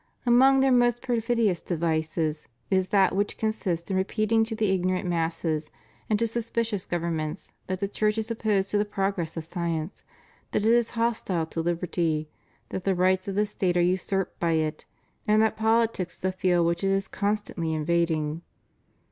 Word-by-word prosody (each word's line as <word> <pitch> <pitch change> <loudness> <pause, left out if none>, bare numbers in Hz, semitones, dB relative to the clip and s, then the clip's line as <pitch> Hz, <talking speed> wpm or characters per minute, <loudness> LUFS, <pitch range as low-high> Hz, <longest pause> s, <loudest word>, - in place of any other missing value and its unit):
Among 265 +3 +6
their 270 0 +4
most 240 -1 +3
perfidious 230 -6 +1
devices 160 -2 -1 0.2
is 190 -1 +2
that 190 -1 +3
which 205 +1 0
consists 195 -6 -2
in - - +1
repeating 215 +3 +2
to 225 0 -4
the 215 -3 +1
ignorant 185 0 0
masses 165 -2 -1 0.4
and 215 - +3
to 230 - +1
suspicious 230 -2 -2
governments 170 -1 -3 0.2
that 185 +1 -3
the 200 - +1
Church 210 +1 0
is 220 +1 -2
opposed 210 -3 0
to 205 - +2
the - - +3
progress 195 -5 -2
of 165 - -3
science, 165 +1 -4 0.5
that 210 - +1
it 225 - +5
is 235 -1 +3
hostile 220 -7 0
to 165 +1 -4
liberty, 165 -2 -1 0.4
that 185 - -4
the 195 -1 +1
rights 185 +1 +2
of 195 - -3
the 210 +1 +2
State 185 -3 -1
are - - +4
usurped 185 +2 0
by 170 -1 +1
it 155 -1 -1 0.4
and 215 0 +4
that 220 - +1
politics 220 -4 +1
is - - -7
a 185 - +2
field 180 -2 +2
which 170 +2 0
it - - +2
is 195 0 0
constantly 200 -5 -2
invading. 160 -1 0
190 Hz, 175 wpm, -26 LUFS, 170-215 Hz, 0.5 s, Among